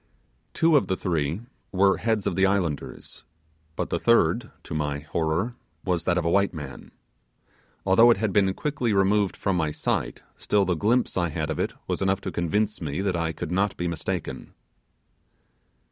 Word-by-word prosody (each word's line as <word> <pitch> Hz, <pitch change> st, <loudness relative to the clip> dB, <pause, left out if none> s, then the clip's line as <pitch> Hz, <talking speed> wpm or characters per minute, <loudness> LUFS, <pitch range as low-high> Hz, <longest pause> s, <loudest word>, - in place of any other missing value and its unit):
Two 165 Hz, -1 st, +4 dB
of -, -, +1 dB
the 95 Hz, -, 0 dB
three 80 Hz, +1 st, -1 dB, 0.3 s
were 95 Hz, +1 st, +3 dB
heads 110 Hz, -3 st, 0 dB
of -, -, 0 dB
the 95 Hz, -, +2 dB
islanders; 90 Hz, -7 st, -3 dB, 0.5 s
but -, -, -3 dB
the -, -, 0 dB
third, 115 Hz, 0 st, +3 dB
to -, -, -7 dB
my 75 Hz, -2 st, -2 dB
horror, 80 Hz, +9 st, -1 dB, 0.3 s
was 90 Hz, -3 st, 0 dB
that 90 Hz, -1 st, +2 dB
of 90 Hz, -, 0 dB
a -, -, +2 dB
white 100 Hz, -1 st, +2 dB
man. 70 Hz, -5 st, -8 dB, 1.0 s
Although 100 Hz, +5 st, +6 dB
it 120 Hz, -, +5 dB
had 105 Hz, -1 st, -1 dB
been 95 Hz, -2 st, +3 dB
quickly 135 Hz, -7 st, -1 dB
removed 100 Hz, 0 st, +2 dB
from 95 Hz, -, 0 dB
my 80 Hz, -3 st, +1 dB
sight, -, -, -2 dB
still 100 Hz, -1 st, +2 dB
the 90 Hz, -, +1 dB
glimpse 110 Hz, +9 st, +1 dB
I 85 Hz, -2 st, +1 dB
had 80 Hz, 0 st, -3 dB
of 80 Hz, -, -3 dB
it -, -, -1 dB
was -, -, -3 dB
enough 95 Hz, 0 st, +1 dB
to -, -, -4 dB
convince 105 Hz, +5 st, -1 dB
me 75 Hz, 0 st, -3 dB
that 95 Hz, -2 st, 0 dB
I 85 Hz, -1 st, 0 dB
could 80 Hz, +1 st, -6 dB
not 100 Hz, +2 st, 0 dB
be 90 Hz, -, -2 dB
mistaken. 85 Hz, -3 st, -4 dB
95 Hz, 180 wpm, -25 LUFS, 80-105 Hz, 1.0 s, Although